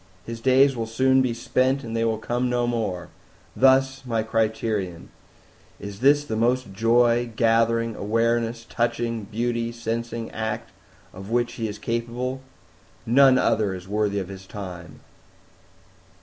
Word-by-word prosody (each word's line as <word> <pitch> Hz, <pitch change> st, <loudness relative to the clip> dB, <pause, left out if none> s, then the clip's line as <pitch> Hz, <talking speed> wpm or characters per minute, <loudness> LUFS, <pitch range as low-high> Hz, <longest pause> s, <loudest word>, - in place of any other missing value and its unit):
His 115 Hz, 0 st, -7 dB
Days 130 Hz, +2 st, +4 dB
will 115 Hz, -1 st, -3 dB
soon 130 Hz, +3 st, +3 dB
be 130 Hz, -2 st, +1 dB
spent 130 Hz, +3 st, 0 dB
and 115 Hz, -1 st, -5 dB
they 115 Hz, -, +1 dB
will 110 Hz, -1 st, +1 dB
come 120 Hz, +3 st, -1 dB
no 120 Hz, 0 st, +1 dB
more; 110 Hz, -7 st, -2 dB, 0.5 s
thus 135 Hz, 0 st, +3 dB
my 115 Hz, -3 st, -1 dB
Criterion: 110 Hz, -5 st, -2 dB, 0.7 s
Is 100 Hz, -1 st, -8 dB
This 145 Hz, +3 st, +4 dB
the 110 Hz, -, -3 dB
most 120 Hz, -1 st, 0 dB
Joy 120 Hz, +2 st, +3 dB
gathering, 115 Hz, 0 st, +2 dB
Awareness 115 Hz, +2 st, 0 dB
touching, 115 Hz, -1 st, -1 dB
Beauty 115 Hz, +2 st, -2 dB
sensing 115 Hz, 0 st, -4 dB
act 110 Hz, -1 st, -4 dB, 0.4 s
of 95 Hz, +2 st, -9 dB
which 120 Hz, 0 st, 0 dB
he 115 Hz, -, -3 dB
is 105 Hz, 0 st, -6 dB
capable? 120 Hz, +4 st, -3 dB, 0.6 s
None 130 Hz, +2 st, +6 dB
other 105 Hz, -6 st, +1 dB
is 90 Hz, 0 st, -10 dB
worthy 105 Hz, 0 st, 0 dB
of 95 Hz, -2 st, -3 dB
his 95 Hz, -1 st, -10 dB
time!" 90 Hz, -4 st, -9 dB
115 Hz, 140 wpm, -24 LUFS, 110-120 Hz, 0.7 s, None